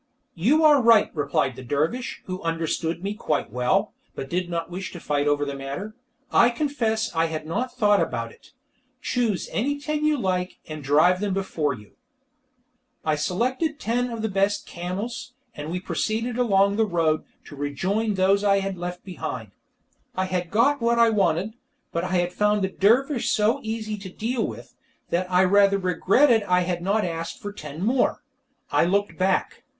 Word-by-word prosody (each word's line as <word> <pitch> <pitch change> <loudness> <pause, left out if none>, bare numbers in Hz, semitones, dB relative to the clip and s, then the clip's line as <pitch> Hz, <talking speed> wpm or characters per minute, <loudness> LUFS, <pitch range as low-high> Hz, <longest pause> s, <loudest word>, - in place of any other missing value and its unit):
"You 260 - +3
are 295 -3 +6
right," 230 -3 +5
replied 140 -3 0
the - - -9
dervish, 150 - -2
who 185 0 -5
understood 165 +1 -2
me 200 +1 -2
quite 150 - -2
well, 125 +1 +1 0.2
but 135 - -6
did 180 0 -1
not 170 0 -3
wish 180 0 -5
to 175 - -7
fight 145 -2 0
the 145 -1 0
matter. 140 +11 -6 0.4
"I 240 - +6
confess 235 -5 -1
I 165 0 +3
had 160 -1 -4
not 240 +11 -2
thought 205 -4 +4
about 115 -1 -2
it. - - -20 0.5
Choose 235 -8 -1
any 285 +6 -1
ten 300 +1 -2
you 305 -1 +3
like, 185 -5 -1
and 155 -1 -7
drive 155 +7 +4
them 200 -1 -1
before 155 -7 -1
you." 105 -3 -16 1.1
I 155 -1 +2
selected 255 - -1
ten 245 +2 0
of 230 -2 -5
the - - +1
best 200 0 0
camels, 190 +8 -5 0.2
and 150 0 -6
we 180 +2 -2
proceeded 225 +5 -2
along 200 -4 +3
the 220 -1 +3
road, 165 -4 +1 0.2
to 145 - -11
rejoin 190 +10 -1
those 195 +2 +3
I 200 -1 +4
had 195 -2 -3
left 180 0 -5
behind. 125 - -6 0.6
I 185 - 0
had 180 -2 -2
got 275 +7 +3
what 235 0 +2
I 230 -1 +5
wanted, 195 0 +1 0.4
but 170 - -2
I 185 - -3
had 175 0 +1
found 210 0 +2
the 190 - +1
dervish 240 +7 +2
so 220 +6 +2
easy 220 -1 -4
to 195 -1 -8
deal 225 +5 -2
with, - - -9 0.4
that 180 +2 0
I 180 +1 +5
rather 200 +1 +4
regretted 200 - +3
I 180 -3 +2
had 175 -1 -2
not 200 +3 +1
asked 165 -1 -4
for 205 0 -6
ten 150 -2 -7
more. 250 +3 +1 0.5
I - - +4
looked 200 +4 +1
back. 190 0 0
190 Hz, 175 wpm, -24 LUFS, 165-225 Hz, 1.1 s, are